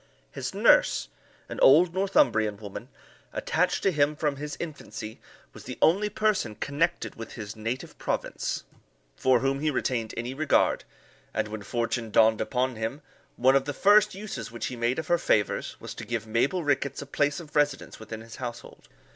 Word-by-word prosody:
His - - -4
nurse, - - +4 0.4
an - - -6
old 165 +5 +6
Northumbrian 110 - +2
woman, 100 -2 -8 0.4
attached - - 0
to 195 - +4
him 150 -2 +2
from 150 -2 -1
his 145 0 -5
infancy, 140 -8 -7 0.3
was - - -12
the - - -6
only 200 +6 +4
person 210 - 0
connected 165 +9 -1
with 115 -1 -9
his 105 -3 -7
native 115 +4 -4
province - - -2 0.5
for 130 -2 +3
whom 135 +1 0
he 155 +1 +1
retained 120 -5 -1
any 120 +2 -3
regard; 150 +1 +2 0.5
and 110 -1 0
when 110 0 -6
fortune 115 +2 -2
dawned 110 0 +4
upon 130 -2 -1
him, 115 +7 -4 0.3
one 130 +2 +4
of 135 -1 +3
the 145 - -3
first 210 +2 +5
uses 190 - -6
which 120 - -4
he 125 - -4
made 120 +2 0
of 160 - -3
her 175 +1 +2
favours, 105 -3 0
was - - -7
to - - -8
give - - -3
Mabel 120 +11 +1
Rickets 140 -1 0
a - - -11
place 145 +2 0
of 155 -3 -12
residence 145 -2 0
within 110 0 -7
his 115 0 -11
household. 120 -2 -8
135 Hz, 175 wpm, -27 LUFS, 115-150 Hz, 0.5 s, old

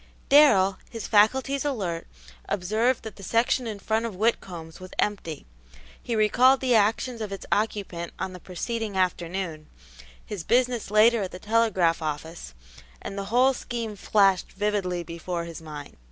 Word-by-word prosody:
Darrell, 200 -10 +6
his 230 -2 -6
faculties 265 +6 +3
alert, 195 - -3 0.4
observed 215 +7 0
that 220 -3 -8
the - - -11
section 235 +4 +1
in 215 -2 -4
front 220 +3 -1
of 215 - -7
Whitcomb's 180 -6 -2
was 185 0 -10
empty; 180 -7 -2 0.6
he 235 - -3
recalled 250 +5 +4
the 255 -2 +1
actions 225 +2 +2
of 210 -2 -4
its 195 - -6
occupant 200 -5 -1
on 185 - -4
the 180 - -9
preceding 210 +3 -4
afternoon, 175 -3 -2 0.6
his 200 -5 -6
business 245 +2 +1
later 215 +2 +5
at 190 - -3
the - - -7
telegraph 190 -6 +2
office, 155 - -5 0.4
and 195 - -7
the 200 0 -4
whole 250 +6 +3
scheme 235 -4 -5
flashed 195 -2 +2
vividly 195 -4 -1
before 170 +1 -4
his 170 -1 -8
mind. 150 -2 -9
205 Hz, 155 wpm, -26 LUFS, 180-230 Hz, 0.6 s, Darrell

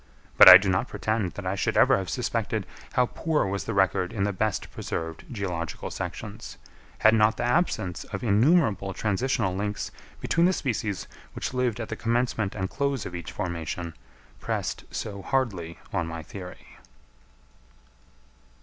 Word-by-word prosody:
But - - +11
I 90 - +14
do 100 +1 -3
not 95 +6 +1
pretend 110 -4 -2
that 100 - -7
I 95 - 0
should 100 - -1
ever - - +6
have 95 -3 -3
suspected - - -2 0.3
how 125 - +4
poor 155 +2 0
was 100 +1 -3
the 115 - -3
record 95 -2 +2
in 100 - -1
the 100 0 0
best 110 +3 -2
preserved 80 -1 -5
geological 90 -8 -4
sections, - - -6 0.4
had 110 - +5
not 110 0 +4
the - - -2
absence 120 - 0
of - - -6
innumerable 110 - +3
transitional 110 -2 0
links 105 +1 -3 0.3
between 170 +1 +2
the 185 - +2
species 110 - -2 0.3
which - - -4
lived 125 -3 0
at 115 - -5
the - - -3
commencement 115 -3 0
and 95 -2 -2
close 140 +1 -2
of - - -6
each 85 -2 -6
formation, 85 -2 -4 0.5
pressed - - -3
so 100 -2 -5
hardly 95 -11 -1 0.2
on 85 - 0
my 80 0 -6
theory. 90 +2 -11
100 Hz, 160 wpm, -26 LUFS, 90-120 Hz, 0.5 s, I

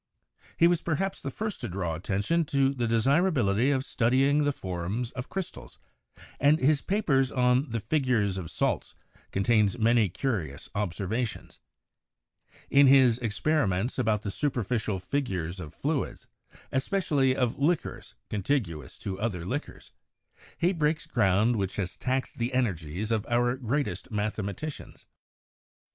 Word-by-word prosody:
He 170 - +5
was 175 -1 +2
perhaps 190 +4 -2
the - - -3
first 215 -1 -4
to - - -3
draw 90 -2 -2
attention 100 - 0
to 140 -2 +2
the 120 -3 -1
desirability 125 - +2
of 135 -1 +1
studying 135 +6 +2
the 145 - +3
forms 95 +2 -4
of 125 0 -6
crystals, 190 -2 -6 0.6
and 145 +2 +5
his 145 0 +3
paper 185 -10 +2
on 125 +2 +3
the 115 0 -2
'Figures 110 -7 +1
of 85 -4 -6
Salts' - - -1 0.4
contains 105 +1 +2
many 115 -2 +3
curious 90 - -3
observations; 105 +4 -3 1.1
in 140 0 +7
his 130 -3 +6
'Experi 120 +3 +1
ments 95 +9 -1
about 110 -4 +1
the 100 - -3
Superficial 115 -6 -1
Figures 95 - -3
of 80 -5 -7
Fluids, - - -3 0.5
especially 135 -3 +1
of 125 -1 0
Liquors 160 +4 -1
contiguous 100 - -2
to 95 -1 -5
other 95 -6 -2
Liquors,' 135 +10 -5 0.7
he 175 +3 +2
breaks 155 -2 0
ground 110 +1 +2
which 95 -2 -2
has 95 -3 -3
taxed 130 -1 -2
the 120 +2 -1
energies 95 -4 -1
of 110 -2 +1
our 120 +1 +2
greatest 135 +3 -2
mathema 105 -1 -2
^ - - -4
ticians. 155 -1 -8
120 Hz, 140 wpm, -28 LUFS, 100-140 Hz, 1.1 s, in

